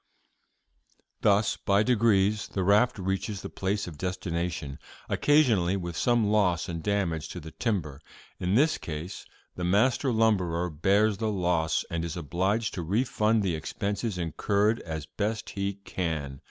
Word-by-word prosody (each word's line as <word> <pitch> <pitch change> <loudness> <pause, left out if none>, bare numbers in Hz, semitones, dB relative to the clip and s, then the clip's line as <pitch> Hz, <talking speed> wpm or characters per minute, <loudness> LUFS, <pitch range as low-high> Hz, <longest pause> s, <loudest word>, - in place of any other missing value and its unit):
"'Thus 105 0 +3
by 100 +1 +2
degrees 105 -3 +2
the 95 - -2
raft 105 +6 +4
reaches 95 +1 -3
the - - -6
place 100 +2 -1
of 80 -4 -9
destination, 85 -5 -3 0.3
occasionally 110 - +3
with 85 -3 -5
some 120 +4 +2
loss 100 -5 +2
and 85 -1 -4
damage 90 -5 -1
to 90 - -6
the 80 -1 -10
timber. 80 - -2 0.4
In 90 +2 0
this 155 +6 +3
case 80 +3 -6 0.3
the 90 - -5
master 120 +9 +2
lumberer 90 -7 +1
bears 100 +7 +2
the 110 -1 0
loss, 85 -5 0
and 85 -1 -1
is 85 0 -4
obliged 95 +7 -1
to 90 - -3
refund 110 +3 +1
the 95 -3 0
expenses 100 +6 -3
incurred 100 +6 +1
as 80 -2 -5
best 105 +4 -3
he 100 0 -2
can. 80 -8 -4
95 Hz, 145 wpm, -28 LUFS, 85-105 Hz, 0.4 s, raft